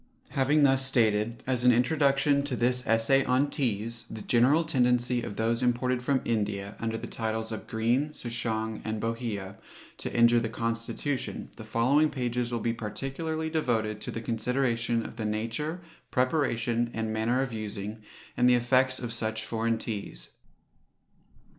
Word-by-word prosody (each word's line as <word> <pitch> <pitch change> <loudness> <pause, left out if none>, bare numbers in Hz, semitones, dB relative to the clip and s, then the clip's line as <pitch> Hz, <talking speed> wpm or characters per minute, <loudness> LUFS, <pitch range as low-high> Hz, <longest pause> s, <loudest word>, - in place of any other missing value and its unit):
Having 145 +3 +3
thus 135 -1 +4
stated, 115 -3 +1
as 125 -2 0
an 125 - +7
Introduction 140 +2 +3
to 140 -3 -2
this 125 +1 +1
Essay 115 +5 +3
on 130 +3 +2
Teas, 115 -4 -2
the 110 -1 -7
general 130 +7 +4
tendency 125 -5 +2
of 100 - -6
those 115 +2 0
imported 125 0 +1
from 130 +1 +1
India, 105 -3 -1
under 115 -1 -2
the 115 - -6
titles 110 -1 -3
of 110 - -6
Green, 120 +7 +1
Souchong, 110 -2 -3
and 110 0 -3
Bohea, 115 -4 -3 0.4
to - - -5
injure 120 0 +5
the 115 - -2
constitution, 115 +4 -3
the - - -9
following 140 +7 +3
pages 125 -3 -2
will 120 - -1
be 115 +1 0
particularly 135 +9 -3
devoted 110 -9 0
to - - -4
the 115 - -4
consideration 115 0 0
of - - -9
the 110 - -3
nature, 115 +11 -2 0.3
preparation, 120 -3 +1
and 110 0 -2
manner 115 +4 +1
of 130 -3 -5
using, 105 0 -5 0.3
and 125 +1 +4
the 125 - +6
effects 130 +2 +3
of 120 -2 -4
such 110 -1 -2
foreign 115 0 0
teas. 100 - -6
120 Hz, 155 wpm, -28 LUFS, 110-130 Hz, 0.4 s, an